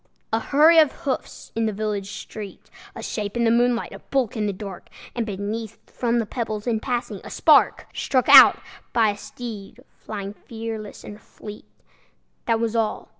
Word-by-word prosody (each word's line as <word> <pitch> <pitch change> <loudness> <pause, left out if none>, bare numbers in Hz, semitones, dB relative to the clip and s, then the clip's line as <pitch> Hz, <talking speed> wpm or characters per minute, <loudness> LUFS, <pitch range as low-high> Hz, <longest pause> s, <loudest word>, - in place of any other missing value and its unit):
A 225 - +3
hurry 310 +7 +5
of 305 -3 +5
hoofs 275 -4 -4
in 225 -1 0
a - - -2
village 205 -1 -3
street, 210 -1 -9 0.2
A - - -7
shape 210 +1 -4
in 235 - +1
the 225 - +3
moonlight, 240 0 +1
a - - -9
bulk 265 -6 -1
in 215 -2 -1
the - - 0
dark, 195 -1 -9 0.3
And 235 -2 -3
beneath, 210 +2 -5
from 240 -1 -1
the 230 - 0
pebbles, 215 -2 -4
in 230 -3 0
passing, 245 0 -3
a - - -9
spark - - +4
Struck 255 -2 0
out - - +10 0.4
by 225 -3 +3
a - - -7
steed 210 -1 -9
flying 200 -2 -7
fearless 225 -1 -7
and 210 +1 -10
fleet: 210 0 -11 0.8
That 230 -1 +2
was 230 0 -1
all! 220 -2 -1
225 Hz, 175 wpm, -23 LUFS, 210-235 Hz, 0.8 s, out